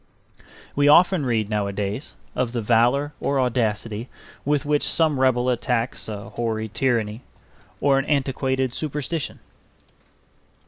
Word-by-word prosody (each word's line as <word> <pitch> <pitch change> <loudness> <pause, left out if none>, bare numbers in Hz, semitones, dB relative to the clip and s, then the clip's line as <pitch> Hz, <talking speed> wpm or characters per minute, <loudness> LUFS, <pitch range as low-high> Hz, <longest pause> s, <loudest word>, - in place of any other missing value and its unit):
We 145 0 +3
often 170 -1 +5
read 110 -3 +1
nowadays 105 +3 -3 0.2
of 125 -2 -1
the 120 - -1
valor 125 +6 +3
or 140 -1 0
audacity 115 -2 -1 0.3
with 145 0 +1
which 150 0 +2
some 155 -4 +2
rebel 130 -2 +3
attacks 125 -1 0
a 100 -2 -6
hoary 110 -2 -2
tyranny 115 -2 0 0.6
or 135 -1 +3
an 135 - -2
antiquated 130 -3 0
superstition. 150 +1 -3
125 Hz, 120 wpm, -23 LUFS, 115-140 Hz, 0.6 s, often